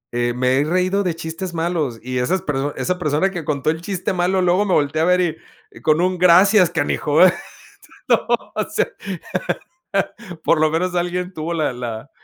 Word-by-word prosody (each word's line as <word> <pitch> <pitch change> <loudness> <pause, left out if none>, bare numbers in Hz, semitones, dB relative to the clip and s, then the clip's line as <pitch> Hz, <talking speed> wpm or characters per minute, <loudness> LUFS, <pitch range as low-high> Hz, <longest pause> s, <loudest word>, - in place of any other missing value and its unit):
Eh, 120 0 0
me 130 +1 +2
he - - +3
reído 185 +4 +1
de 175 -3 -1
chistes 165 +2 -6
malos 160 -8 -1
y 125 0 -2
esas 180 +9 0
persona 145 0 -2
esa 180 0 -1
persona 155 +4 +1
que 175 -4 -5
contó 145 0 -1
el 160 +1 -5
chiste 190 +1 -3
malo 185 +1 +1
luego 180 +3 +3
me 190 - 0
voltea 145 +2 +1
a - - +3
ver 180 -3 +2 0.3
y - - -15
con 155 +1 +2
un 185 0 +1
gracias 180 +1 +6
canijo, 150 +1 0 0.9
¿no?, - - +3 0.3
o - - 0
sea, - - 0 1.6
por - - +3
lo 155 -1 +3
menos 180 +3 -1
alguien 180 +1 -2
tuvo 160 +2 -4
la 155 -5 0
la, 115 -3 -6
165 Hz, 180 wpm, -20 LUFS, 150-180 Hz, 1.6 s, gracias